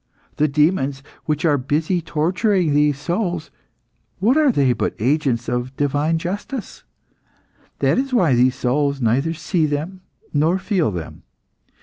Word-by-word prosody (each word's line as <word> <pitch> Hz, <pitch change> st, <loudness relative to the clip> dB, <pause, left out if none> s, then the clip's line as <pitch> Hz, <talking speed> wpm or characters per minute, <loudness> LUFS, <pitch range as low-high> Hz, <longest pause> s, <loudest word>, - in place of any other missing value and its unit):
The 150 Hz, -, +3 dB
demons 145 Hz, -2 st, +1 dB, 0.2 s
which 150 Hz, +1 st, -1 dB
are 145 Hz, -3 st, +3 dB
busy 155 Hz, +7 st, 0 dB
torturing 175 Hz, +2 st, +1 dB
these 145 Hz, -1 st, +3 dB
souls, 175 Hz, +1 st, -2 dB, 0.7 s
what 220 Hz, +8 st, +2 dB
are 305 Hz, -3 st, +4 dB
they 135 Hz, -, +2 dB
but 115 Hz, -, -2 dB
agents 125 Hz, -1 st, 0 dB
of 125 Hz, +2 st, -3 dB
divine 145 Hz, +3 st, +1 dB
justice? 200 Hz, +8 st, -5 dB, 1.0 s
That -, -, +3 dB
is 270 Hz, 0 st, -2 dB
why 180 Hz, -, +3 dB
these 125 Hz, +1 st, +3 dB
souls 140 Hz, +3 st, 0 dB
neither 135 Hz, +8 st, +1 dB
see 160 Hz, 0 st, 0 dB
them 155 Hz, +6 st, -4 dB, 0.3 s
nor 160 Hz, +5 st, +2 dB
feel 190 Hz, -, 0 dB
them. 85 Hz, -5 st, -7 dB
150 Hz, 135 wpm, -20 LUFS, 135-180 Hz, 1.0 s, are